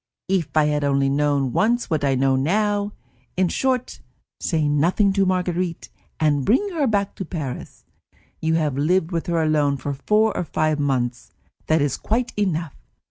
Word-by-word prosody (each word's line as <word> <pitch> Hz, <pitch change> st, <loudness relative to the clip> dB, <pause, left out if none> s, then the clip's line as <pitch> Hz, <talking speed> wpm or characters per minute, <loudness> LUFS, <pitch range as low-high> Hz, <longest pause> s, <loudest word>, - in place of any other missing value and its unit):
If 180 Hz, -5 st, -1 dB
I 155 Hz, -, +5 dB
had 150 Hz, -1 st, 0 dB
only 140 Hz, -1 st, +2 dB
known 140 Hz, -2 st, +1 dB
once 240 Hz, +3 st, +1 dB
what 155 Hz, -3 st, 0 dB
I 135 Hz, -1 st, +2 dB
know 135 Hz, +1 st, +2 dB
now! 205 Hz, +8 st, 0 dB, 0.4 s
In 185 Hz, -1 st, +2 dB
short, 255 Hz, +2 st, -1 dB, 0.4 s
say 160 Hz, -4 st, 0 dB
nothing 175 Hz, +7 st, +2 dB
to 195 Hz, -1 st, +2 dB
Marguerite, 180 Hz, -2 st, -1 dB, 0.3 s
and 145 Hz, -3 st, +2 dB
bring 265 Hz, -, +2 dB
her 300 Hz, -5 st, +1 dB
back 200 Hz, -3 st, 0 dB
to -, -, -3 dB
Paris. 155 Hz, -7 st, -6 dB, 0.5 s
You 160 Hz, 0 st, +1 dB
have 155 Hz, -4 st, 0 dB
lived 170 Hz, +3 st, +1 dB
with 165 Hz, -2 st, -2 dB
her 170 Hz, -2 st, +1 dB
alone 150 Hz, -2 st, +2 dB
for 140 Hz, +1 st, -4 dB
four 210 Hz, +9 st, +1 dB
or -, -, -1 dB
five 155 Hz, -1 st, 0 dB
months; 125 Hz, -4 st, -1 dB, 0.4 s
that 155 Hz, -2 st, +3 dB
is 145 Hz, -, -1 dB
quite 240 Hz, +3 st, -1 dB
enough. 170 Hz, -7 st, -1 dB
160 Hz, 170 wpm, -22 LUFS, 145-195 Hz, 0.5 s, I